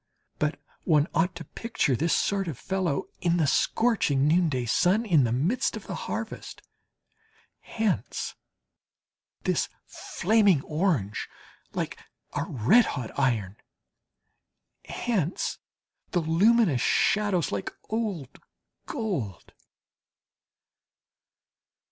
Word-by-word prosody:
But 150 0 0 0.2
one 150 -4 +4
ought 170 +4 +1
to 165 - -7
picture 225 - -1
this 165 +7 +1
sort 195 -2 0
of 150 -7 -4
fellow 185 -7 -1 0.2
in 175 -1 +1
the 160 - +3
scorching 145 - +2
noonday 155 -6 +2
sun, 185 - +2
in 160 - +4
the 115 - 0
midst 160 - 0
of - - -10
the - - -5
harvest. - - -5 1.0
Hence 220 -3 -2 1.1
this - - +1 0.2
flaming 200 -6 +2
orange, 150 - -1 0.4
like - - -4 0.3
a - - -1
red 145 - +4
hot 125 -5 -4
iron; 110 -8 0 1.3
hence 195 -8 -2 0.5
the 180 - +1
luminous 170 - +3
shadows 190 -6 +2
like 100 -1 -3 0.2
old 205 - -3 0.5
gold. 185 - -4
170 Hz, 100 wpm, -27 LUFS, 135-205 Hz, 1.3 s, one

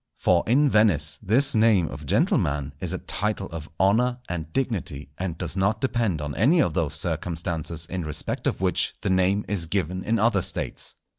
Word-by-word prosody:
For 90 -2 +2
in 140 +6 +4
Venice 80 - +2
this 130 +8 +4
name 110 -6 +4
of 70 +1 -9
gentleman 70 0 +1
is - - -3
a - - -2
title 105 -1 -3
of 80 -2 -7
honour 115 +6 +3
and 80 -2 -5
dignity, 85 - -3
and 90 -3 -3
does 85 -1 -3
not 100 +3 +1
depend 115 - -1
on 75 -1 -4
any 145 - +3
of - - +2
those 80 -4 -1
circumstances 85 0 -2
in 90 +1 -4
respect 75 -2 -2
of - - -2
which - - +1
the - - 0
name 95 +2 +2
is 95 -5 -2
given 90 0 -2
in 115 +1 +1
other 110 -3 +2
States. - - -2
95 Hz, 180 wpm, -25 LUFS, 80-110 Hz, -, in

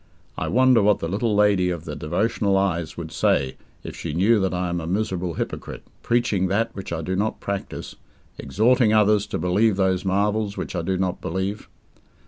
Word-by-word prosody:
I - - -3
wonder 130 -1 +4
what 105 0 +4
the 85 - -4
little 105 +4 0
lady 100 -3 +3
of 85 -2 -4
the - - -5
devotional 100 +4 0
eyes 85 -4 -1
would 80 -2 -6
say 70 -4 +1 0.3
if - - -7
she 75 - -5
knew 105 +6 +4
that 95 -1 0
I 90 0 -2
am 85 0 -2
a 80 - -6
miserable 90 -3 -2
hypocrite, - - -5 0.2
preaching 105 -6 +1
that 115 +4 -1
which 95 -3 -7
I 80 -1 -3
do 95 +4 -2
not 105 +3 -1
practise, 100 -1 -5 0.5
exhorting 110 - +2
others 105 -1 +3
to - - -3
believe 100 +4 +2
those 95 -1 +1
marvels 100 +2 0
which - - -5
I 85 - -1
do 95 +3 -1
not 90 -1 -2
believe? 95 +4 -3
95 Hz, 190 wpm, -23 LUFS, 90-105 Hz, 0.5 s, wonder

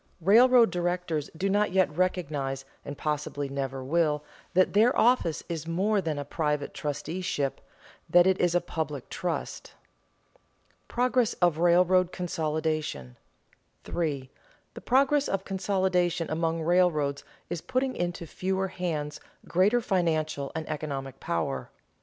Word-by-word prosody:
Railroad 235 +6 +6
directors 175 -4 -2
do 195 - 0
not 205 +1 +2
yet 185 -5 +2
recognize, 145 -7 -1 0.2
and 145 - -7
possibly 150 -1 -2
never 135 -1 -3
will, 150 +1 +1 0.3
that 185 0 +4
their 225 +5 +4
office 230 -10 +3
is 165 -2 -5
more 195 +5 +1
than 160 -4 -2
a 145 - -4
private 150 -1 -2
trusteeship, 145 -1 -3 0.5
that 175 0 +6
it 190 0 +2
is 175 -1 +2
a 175 - +3
public 150 -5 -4
trust. 175 -3 -4
[Sidenote: - - -32
Progress 250 -1 +1
of 175 -3 +1
railroad 180 +1 +4
consolidation] 155 - -2 0.7
3. 145 -6 -3 0.4
_The - - -10
progress 275 +3 +3
of 195 0 -2
consolidation 185 -3 0
among 165 0 -1
railroads 160 -5 +2 0.3
is 170 -2 -3
putting 260 0 -1
into 175 -1 -3
fewer 190 +3 -2
hands 155 -5 -3 0.3
greater 205 +7 +3
financial 155 -8 0
and 160 -1 -4
economic 140 -3 -5
power. 70 -6 -2
170 Hz, 130 wpm, -28 LUFS, 150-190 Hz, 0.7 s, Railroad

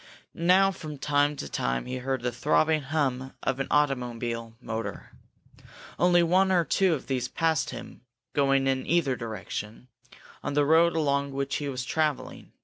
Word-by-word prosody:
Now 185 +3 +4
from 155 -5 -8
time 145 +1 +1
to - - -6
time 60 0 -2
he 125 +1 -4
heard 130 -1 -2
the 125 - 0
throbbing 155 +5 +2
hum 135 -3 -1
of 130 - -1
an 135 - -1
automobile 120 -5 -1
motor. 115 -2 -5 0.9
Only 175 0 +5
one 185 +3 +3
or 175 -3 +3
two 190 -2 +2
of 140 - -8
these 125 -2 -1
passed 160 +2 0
him, - - -9 0.3
going 135 -2 +2
in 135 -1 0
either 160 -6 +2
direction, 110 +1 -6 0.5
on 145 - -3
the 145 0 +3
road 165 +2 +4
along 140 -3 0
which 140 0 -2
he 145 -1 -3
was 125 -2 -4
traveling. 155 0 -2
140 Hz, 160 wpm, -27 LUFS, 125-160 Hz, 0.9 s, Only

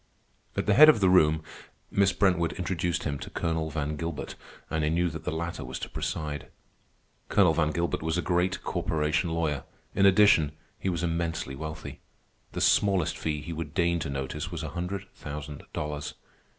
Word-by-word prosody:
At - - 0
the 105 - +4
head 155 +7 +10
of 150 - +5
the 95 -2 +4
room, 80 -3 +5 0.5
Miss 100 -1 +4
Brentwood 90 -5 +2
introduced 90 -1 -1
him 70 -3 -2
to - - -7
Colonel 80 -2 -1
Van 75 -1 -2
Gilbert, 80 -1 -4 0.3
and 80 -1 -1
I 75 - +2
knew 85 +1 +1
that 80 +1 -8
the - - -1
latter 85 +2 -3
was - - -5
to - - -6
preside. 75 -2 -3 0.8
Colonel 90 -5 +5
Van 75 -1 +2
Gilbert 85 +3 -1
was 80 +1 -1
a 90 - 0
great 90 +2 0
corporation 80 +3 0
lawyer. 80 -3 -1 0.3
In 100 - +5
addition, 95 -7 +5 0.3
he 95 - -1
was 85 -2 -2
immensely 85 -4 -1
wealthy. 80 +2 -7 0.5
The - - -3
smallest 95 -5 +3
fee 75 -2 -3
he 85 - -5
would 80 -2 -6
deign 85 -1 +2
to 75 - -3
notice 70 +4 -3
was 85 -1 -4
a 80 - -3
hundred 90 +4 -4
thousand 75 -1 -7
dollars. 75 -1 -4
80 Hz, 180 wpm, -28 LUFS, 75-90 Hz, 0.8 s, head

